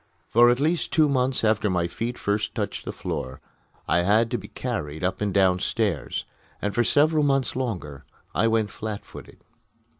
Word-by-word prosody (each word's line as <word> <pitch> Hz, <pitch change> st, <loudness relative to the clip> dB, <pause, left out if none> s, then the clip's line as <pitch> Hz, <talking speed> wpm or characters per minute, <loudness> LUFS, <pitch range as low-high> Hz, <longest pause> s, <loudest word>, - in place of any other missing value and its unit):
For 120 Hz, +1 st, +6 dB
at 120 Hz, +1 st, +2 dB
least 160 Hz, +4 st, 0 dB
two 155 Hz, -2 st, +4 dB
months 130 Hz, -2 st, +1 dB
after 110 Hz, -1 st, +2 dB
my 90 Hz, -2 st, +1 dB
feet 115 Hz, +7 st, -4 dB
first 105 Hz, +1 st, -1 dB
touched -, -, -3 dB
the -, -, -3 dB
floor 65 Hz, 0 st, -5 dB, 0.5 s
I 85 Hz, -, +3 dB
had 110 Hz, +6 st, +3 dB
to 120 Hz, -, 0 dB
be -, -, -10 dB
carried 75 Hz, +3 st, -4 dB
up 90 Hz, +3 st, -1 dB
and 105 Hz, -1 st, 0 dB
downstairs, 95 Hz, -, +1 dB, 0.3 s
and 100 Hz, 0 st, -2 dB
for 120 Hz, -, +2 dB
several 155 Hz, +4 st, +3 dB
months 135 Hz, -3 st, +1 dB
longer 90 Hz, -, -4 dB, 0.3 s
I 115 Hz, -, +2 dB
went 110 Hz, -2 st, +1 dB
flat 105 Hz, -2 st, -6 dB
footed. -, -, -13 dB
110 Hz, 175 wpm, -25 LUFS, 95-125 Hz, 0.5 s, For